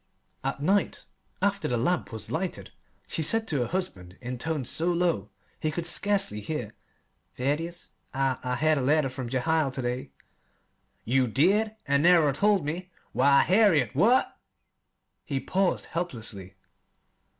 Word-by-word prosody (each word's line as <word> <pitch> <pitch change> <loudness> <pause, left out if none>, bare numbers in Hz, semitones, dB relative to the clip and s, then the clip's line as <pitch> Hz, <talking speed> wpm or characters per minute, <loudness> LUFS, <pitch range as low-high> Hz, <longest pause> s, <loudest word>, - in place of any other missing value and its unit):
At 135 +1 -3
night, 195 +4 +1 0.4
after 200 0 +1
the 120 - 0
lamp 170 +8 0
was 110 -1 -5
lighted, 180 +3 -3 0.3
she - - -1
said 225 +8 +1
to 145 - 0
her 120 - 0
husband 100 - -4
in 125 0 -6
tones 150 -4 -2
so 170 +2 0
low 170 - 0 0.3
he 155 - -1
could 165 +2 -3
scarcely 195 - +2
hear: 115 -3 -4 0.6
"Thaddeus, 150 +7 -2 0.2
I 135 -1 0
I 125 0 -1
had 155 +1 +2
a - - -1
letter 145 +1 +2
from 130 -2 -6
Jehiel 155 +3 +1
to 130 0 -5
day." 125 +1 -3 1.0
"You 125 +2 +2
did 200 - +2
and 140 0 +2
never 165 -4 +5
told 200 +1 +2
me? 175 +5 -4 0.2
Why, 140 0 +4
Harriet, 180 - +3
what 225 - +3 0.4
" - - -52
He 135 - +1
paused 190 +6 0
helplessly. 110 - -5
150 Hz, 150 wpm, -27 LUFS, 125-180 Hz, 1.0 s, never